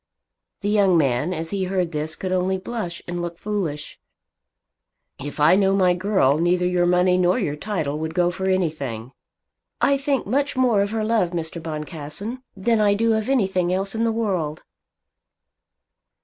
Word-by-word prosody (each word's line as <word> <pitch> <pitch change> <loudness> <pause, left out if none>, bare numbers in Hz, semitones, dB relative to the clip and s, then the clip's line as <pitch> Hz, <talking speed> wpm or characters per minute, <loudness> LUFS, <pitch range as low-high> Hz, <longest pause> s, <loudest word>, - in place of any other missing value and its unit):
The 205 - -1
young 200 -4 +4
man 140 +2 +1
as 165 -2 -4
he 195 -2 -1
heard 180 -2 -1
this 155 0 -3
could 185 - -4
only 185 +1 +1
blush 185 -3 -5
and 175 0 -3
look 170 -1 -5
foolish. 180 -9 -4 1.2
"If 145 +3 -7
I 150 +5 +6
know 195 0 +3
my 185 -2 +4
girl, 180 -6 +2
neither 175 +1 +2
your 180 -1 +2
money 180 +1 +3
nor 180 +3 +3
your 170 - -1
title 155 -5 -3
would 160 +1 -4
go 175 -1 +2
for 190 +1 -3
anything." 140 -11 -2 0.7
"I 280 - +3
think 275 -2 -1
much 280 +5 0
more 240 -6 +3
of 200 - 0
her 220 0 -2
love, 215 -6 +1
Mr. 165 0 -4
Boncassen, 160 - -6 0.2
than 225 +3 +1
I 205 -1 +4
do 225 +2 +2
of 220 +2 -1
anything 190 -9 +1
else 195 +1 0
in 225 0 -1
the 230 - +2
world." 185 -9 -2
185 Hz, 170 wpm, -23 LUFS, 165-210 Hz, 1.2 s, I